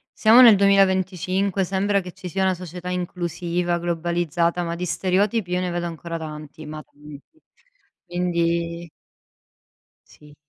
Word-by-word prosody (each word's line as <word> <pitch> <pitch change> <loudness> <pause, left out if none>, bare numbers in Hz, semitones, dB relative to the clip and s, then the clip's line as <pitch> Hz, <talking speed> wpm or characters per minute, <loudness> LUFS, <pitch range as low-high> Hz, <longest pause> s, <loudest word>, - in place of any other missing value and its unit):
siamo 225 +3 +6
nel 230 -5 +9
2025, 190 -1 +2
sembra 200 +2 0
che 180 -2 -9
ci 185 -1 -9
sia 190 +2 -2
una 190 -1 +2
società 180 0 -8
inclusiva, 175 -1 -2
globalizzata, 170 0 -1
ma 170 0 -3
di 180 - -4
stereotipi 190 +3 0
io 180 - +1
ne 180 -1 -2
vedo 175 0 -3
ancora 165 0 -6
tanti, 155 -1 -8
ma 155 0 -8
tanti 145 0 -14 0.9
quindi 170 -1 -1 1.2
Sì. 150 -1 -18
175 Hz, 130 wpm, -23 LUFS, 170-190 Hz, 1.2 s, nel